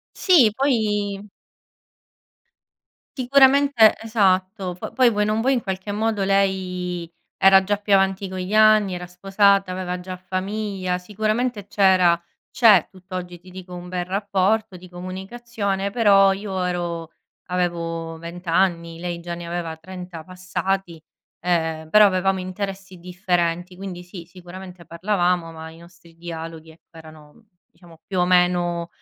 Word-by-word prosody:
Sì 285 - +5
poi 210 -6 0 1.9
sicuramente 270 -2 +5
Esatto 190 -4 0
po 180 - -7
poi 255 -2 +4
vuoi 210 -2 0
o - - -1
non 215 +1 0
vuoi 265 +2 +2
in 245 - 0
qualche 190 +1 -4
modo 215 -1 -1
lei 185 -3 -1 0.3
era 195 0 +6
già 205 +2 0
più 205 0 -4
avanti 195 0 +2
con 185 - -6
gli 185 +3 -4
anni, 215 -3 +5
era 180 0 -6
sposata 195 +2 +2
aveva 180 -1 -4
già 185 0 -7
famiglia 185 0 -3
sicuramente 215 +3 -2
c’era 185 -4 +4 0.3
c’è 210 -8 +5
tutt’oggi, 185 -1 -8
ti 185 +2 -16
dico, 185 -1 -10
un 175 0 -8
bel 180 0 -3
rapporto 195 +1 0
di 180 0 -14
comunicazione. 195 +2 -4
Però 200 -4 +5
io 195 -2 -4
ero 170 -2 -3 0.4
avevo 170 -2 -3
20 170 +2 -9
anni, 170 -1 0
lei 175 0 -5
già 170 0 -6
ne 170 0 -8
aveva 170 -1 -4
30 180 0 -9
passati, 185 -1 -4 0.4
ehm, 160 -3 -1
però 210 0 +7
avevamo 190 0 +1
interessi 190 0 -6
differenti 180 0 -2
quindi 185 -2 -7
sì, 175 -1 -10
sicuramente 180 0 -12
parlavamo 175 -2 -1
ma 160 0 -9
i 160 - -15
nostri 170 0 -18
dialoghi 165 -1 -8
ecco 165 +1 -21
erano 155 +4 -15 0.3
diciamo 170 -1 -19
più 185 -2 -1
o 180 - +4
meno 175 -1 +2
185 Hz, 140 wpm, -22 LUFS, 175-200 Hz, 1.9 s, però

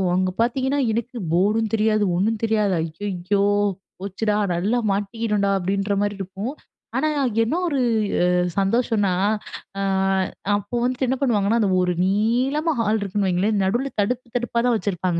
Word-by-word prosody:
அங்க 185 0 +1
பாத்தீங்கன்னா 265 +4 +1
எனக்கு 235 +3 -3
போர்டும் 210 +5 +2
தெரியாது 215 -1 +2
ஒண்ணும் 215 +4 0
தெரியாது. 215 -3 +2
அய்யய்யோ! 185 +4 -2 0.6
போச்சுடா 205 +2 -1 0.2
நல்லா 195 +8 0
மாட்டிக்கிட்டோம்டா 205 0 -1
அப்படின்ற 195 +2 -1
மாரி 205 0 -1
இருக்கும். 195 +7 -5 0.4
ஆனா 310 +3 +1 0.3
என்ன 240 +9 -1
ஒரு 285 -4 0 0.8
சந்தோஷம்னா, 205 -1 +1 0.7
ஆ - - -1 0.8
அப்போ 205 +4 -6
வந்துட்டு 255 +1 0
என்ன 260 +1 0
பண்ணுவாங்கன்னா 225 -3 +2
அந்த 200 - +2
ஒரு 180 0 +1
நீளமா 250 - +1
ஹால் 220 0 +1
இருக்குன்னு 200 0 -1
வைங்களேன். 200 +4 +1
நடுவுல 240 +8 0
தடுப்பு 250 +4 -2
தடுப்பா 240 -1 -1
தான் 245 -2 +3
வச்சிருப்பாங்க. 180 -4 -1
210 Hz, 135 wpm, -22 LUFS, 195-235 Hz, 0.8 s, தான்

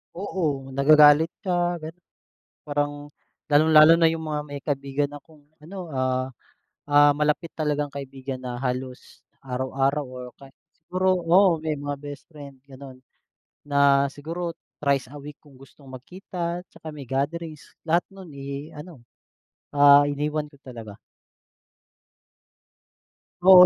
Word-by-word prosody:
Oo, 160 -8 -2
nagagalit 150 +3 +6
siya 175 -2 -1
gano'n 165 +3 -10 0.6
parang 145 0 -3 0.4
lalong-lalo 155 +2 +7
na 165 - +4
yung 165 0 -4
mga 150 -1 -2
may 145 -1 -7
kaibigan 140 0 -2
akong 150 +1 -20 0.2
ano, 180 -1 -8
ah, 130 -1 -1 0.6
ah, 145 0 +6
malapit 150 +3 0
talagang 150 -2 -1
kaibigan 135 -1 -6
na 125 -1 -5
halos 125 0 -5 0.2
araw-araw 135 +2 -1
or 125 -1 -9
kaya 135 -1 -15 0.2
siguro, 185 +3 0
oo, 175 +1 +4
may 155 0 -3
mga 145 0 -4
best 145 0 -10
friend 140 -5 -12
gano'n. 130 -1 -12 0.6
Na 140 -1 +4
siguro 165 +4 -5 0.2
trice 140 -3 0
a 145 - -12
week 145 0 -10
kung 145 -3 -19
gustong 135 +1 -17
magkita 170 +6 -6
'tsaka 155 - -10
may 140 -4 -10
gatherings 150 +4 -4
lahat 170 +2 +1
no'n, 190 -2 -12
eh, 140 +2 -6
ano, 150 -2 -11 0.7
ah, 145 0 +7
iniwan 150 +1 -2
ko 145 -1 -19
talaga. 115 -6 -10 2.4
Oo, 180 0 +9
145 Hz, 125 wpm, -24 LUFS, 135-160 Hz, 2.4 s, Oo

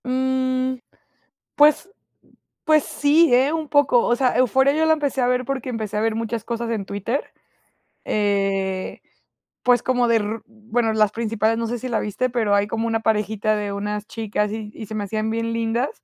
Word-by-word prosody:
Mm, 260 0 0 0.8
pues 300 +5 +4 0.7
pues 310 -2 +4
sí, 295 0 +3
¿eh? 260 +4 +4
Un 320 -1 -2
poco. 285 -5 +3
O 240 - +2
sea, 255 0 +1
Euphoria 265 +3 +3
yo 315 +1 +2
la 320 - +5
empecé 285 -4 -1
a 245 - +2
ver 250 0 +1
porque 260 -1 -4
empecé 220 -4 -4
a - - 0
ver 225 0 +1
muchas 225 0 -3
cosas 235 0 -4
en 220 -4 -2
Twitter. 205 +8 -3 0.7
Eh, 195 -2 -1 0.6
pues 245 -2 +4
como 250 -1 +1
de 230 -1 +4
r 215 +1 -3
bueno, 225 +1 -2
las 215 -2 +3
principales, 225 0 0
no 230 - -2
sé 240 +1 -3
si 255 - -5
la 235 -3 0
viste, 210 +5 -2
pero 230 -4 0
hay 205 0 +2
como 225 +1 -2
una 225 -1 0
parejita 215 -1 0
de 205 -1 -3
unas 210 +1 -4
chicas 210 -2 -2
y 215 -1 -5
y 220 - -8
se 220 - -9
me 210 - -2
hacían 215 +2 -2
bien 230 0 -2
lindas, 230 +3 -1
230 Hz, 190 wpm, -22 LUFS, 215-255 Hz, 0.8 s, la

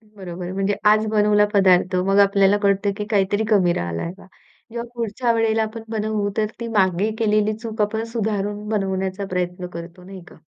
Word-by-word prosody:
बरोबर 180 -2 -7
आहे. 180 +1 -5
म्हणजे 195 +1 0
आज 215 +1 +4
बनवला 210 -1 +4
पदार्थ 185 -2 +4
मग 195 +1 +3
आपल्याला 200 0 +4
कळतं 200 0 +2
की 210 - -3
काहीतरी 205 +1 +1
कमी 185 -5 +3
राहिलंय 85 - -3
बा. - - -15 0.5
जेव्हा 235 +1 -5
पुढच्या 235 +1 -1
वेळेला 225 -1 +1
आपण 220 +1 -6
बनवू 215 -2 -1
तर 215 - +2
ती 235 - -4
मागे 190 +2 +2
केलेली 215 -1 +2
चूक 220 -1 -5
आपण 220 +2 0
सुधारून 210 -2 -2
बनवण्याचा 190 -2 -2
प्रयत्न 180 0 -3
करतो 170 +2 -10
नाही 190 0 -10
का? - - -15
205 Hz, 175 wpm, -21 LUFS, 190-215 Hz, 0.5 s, आज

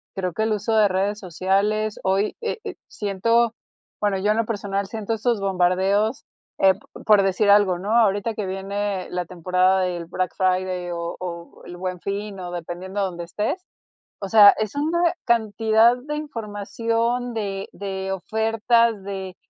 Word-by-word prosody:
creo 185 -2 -2
que 220 - -1
el 220 0 +1
uso 210 +2 -1
de 215 -2 +5
redes 200 +2 -1
sociales, 200 +4 0
hoy, 195 +2 +1
eh 460 0 -2
eh, - - -6
siento, 230 - +1 0.5
bueno, 205 -2 +1
yo 205 +2 +1
en 215 - +1
lo 230 - +1
personal 200 -2 -2
siento 220 +1 -3
estos 225 0 0
bombardeos, 195 +5 +1 0.3
eh, 190 0 +5
p 190 - -17 0.3
por 210 -2 +6
decir 195 +2 +2
algo, 200 -3 +5
¿no? 195 +4 -4
ahorita 210 0 +2
que 210 -2 -4
viene 195 0 -3
la 180 0 -2
temporada 185 +2 +1
del 175 -2 -2
Black 180 +1 -2
Friday 185 -1 0
o 170 0 -4
o 170 -2 -7
El 175 0 -9
Buen 180 -1 -4
Fin, 200 +1 -4
o 180 -1 -6
dependiendo 175 +3 -5
donde 175 -2 -5
estés, 215 - -3 0.6
o 195 - -4
sea, 210 -2 +9
es 215 -2 -3
una 320 +4 0 0.3
cantidad 225 0 +3
de 290 +4 -5
información, 230 -2 -2
de 200 -3 -3
de 190 -1 -4
ofertas, 225 +2 +1
de 190 -2 -6
200 Hz, 165 wpm, -23 LUFS, 185-220 Hz, 0.6 s, sea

